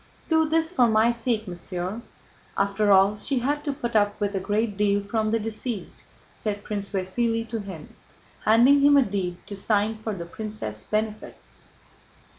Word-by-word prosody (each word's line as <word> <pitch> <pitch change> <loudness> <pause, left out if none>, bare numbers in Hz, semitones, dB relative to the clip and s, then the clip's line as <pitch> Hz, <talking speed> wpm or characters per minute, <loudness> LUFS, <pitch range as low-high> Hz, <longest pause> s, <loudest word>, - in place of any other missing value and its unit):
"Do 320 -1 +3
this 325 +1 +1
for 250 -9 +4
my 220 +1 +4
sake, 230 -2 -1
mon 180 - -5
cher; 180 +5 -4 0.6
after 200 +1 +2
all, 195 +2 +5
she 265 +6 -1
had 285 +4 -1
to 290 - 0
put 240 -5 -5
up 205 -1 +2
with 205 -1 -1
a 195 - 0
great 210 +2 -1
deal 205 0 +2
from 215 +1 -1
the 225 - +2
deceased," 220 0 -5 0.3
said 205 -2 -4
Prince 200 -2 -3
Vasíli 225 +4 -1
to 230 - -3
him, 190 -7 -9 0.5
handing 245 +6 +5
him 285 0 +6
a 275 - +6
deed 190 -5 -3
to 205 - -7
sign 210 +2 +1
for 220 -1 -4
the 170 -2 -6
princess' 170 - -6
benefit. 215 - -3
215 Hz, 175 wpm, -25 LUFS, 200-235 Hz, 0.6 s, him